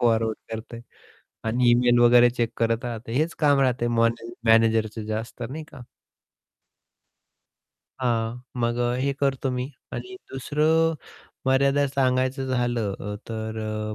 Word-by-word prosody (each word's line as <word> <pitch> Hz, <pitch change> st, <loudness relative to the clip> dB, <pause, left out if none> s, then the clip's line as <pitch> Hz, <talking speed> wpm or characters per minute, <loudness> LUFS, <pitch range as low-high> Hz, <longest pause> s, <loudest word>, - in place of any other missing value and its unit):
Forward 115 Hz, -2 st, +2 dB, 0.2 s
करतंय 115 Hz, +1 st, -7 dB, 0.7 s
आणि 120 Hz, +1 st, +3 dB
email 120 Hz, 0 st, +4 dB
वगैरे 120 Hz, 0 st, +6 dB
चेक 120 Hz, -1 st, -1 dB
करत 115 Hz, +1 st, 0 dB
राहते, 115 Hz, -1 st, -5 dB
हेच 155 Hz, +7 st, 0 dB
काम 145 Hz, -2 st, +4 dB
राहतंय 125 Hz, -2 st, +1 dB
मॉन 115 Hz, 0 st, +3 dB, 0.3 s
मॅनेजरच 115 Hz, -1 st, +3 dB
जे 110 Hz, 0 st, -4 dB
असतं 115 Hz, +2 st, -5 dB
नाही 155 Hz, +2 st, -6 dB
का. 140 Hz, -, -11 dB, 2.2 s
हां, 120 Hz, -1 st, -1 dB, 0.2 s
मग 120 Hz, 0 st, 0 dB
अ, 120 Hz, 0 st, +1 dB
हे 140 Hz, +1 st, +1 dB
करतो 135 Hz, -1 st, 0 dB
मी 125 Hz, +2 st, -3 dB, 0.2 s
आणि 375 Hz, -, -6 dB, 0.2 s
दुसरं 155 Hz, +4 st, +2 dB, 0.5 s
मर्यादा 140 Hz, +2 st, +3 dB
सांगायचं 130 Hz, 0 st, 0 dB
झालं 120 Hz, -5 st, 0 dB
अ, 105 Hz, +1 st, -4 dB
तर 110 Hz, -1 st, -4 dB
अ, 110 Hz, 0 st, -3 dB
120 Hz, 135 wpm, -25 LUFS, 115-130 Hz, 2.2 s, वगैरे